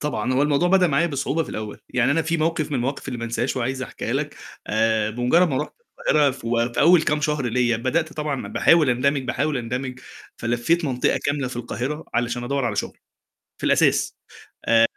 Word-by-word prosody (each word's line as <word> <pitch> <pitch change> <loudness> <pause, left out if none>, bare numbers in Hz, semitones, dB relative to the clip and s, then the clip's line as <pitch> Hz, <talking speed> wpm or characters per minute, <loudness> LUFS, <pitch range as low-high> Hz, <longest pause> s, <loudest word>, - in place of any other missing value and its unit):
طبعًا، 130 -5 -1
هو 130 +2 +2
الموضوع 150 +4 +2
بدأ 185 -1 +5
معايا 150 +2 +2
بصعوبة 145 +1 -1
في - - -9
الأول 110 -1 -6
يعني 125 +1 +1
أنا 165 +3 +2
في 165 +1 0
موقف 160 -1 0
من - - -2
المواقف 135 +3 -3
اللي 125 -2 -4
ما 115 - -4
أنسهاش 120 +3 -2
وعايز 130 +1 -2
أحكيها - - -5
لك - - -2 0.3
آآ، 110 0 +1
بمجرد 125 +10 +3
ما 135 - -1
رُحت 150 - -3 0.4
القاهرة 150 -2 +4 0.4
في - - -2
أول 170 +1 +6
كام 150 -1 0
شهر 150 -3 0
ليّا 120 0 +1
بدأت 155 +7 -1
طبعًا 150 -3 -3
باحاول 160 -5 +4
أندمِج 135 +3 +1
باحاول 145 +3 -1
أندمِج 125 +2 -4 0.4
فلفيت 120 +9 0
منطقة 125 -4 +1
كاملة 145 -2 0
في 125 - -7
القاهرة، 125 +5 -4
علشان 120 0 -1
أدوّر 140 +1 -1
على 110 -4 -1
شغل، - - -3 0.6
في - - -5
الأساس - - +3 0.5
آآ، 115 0 +5
135 Hz, 190 wpm, -23 LUFS, 120-150 Hz, 0.6 s, أول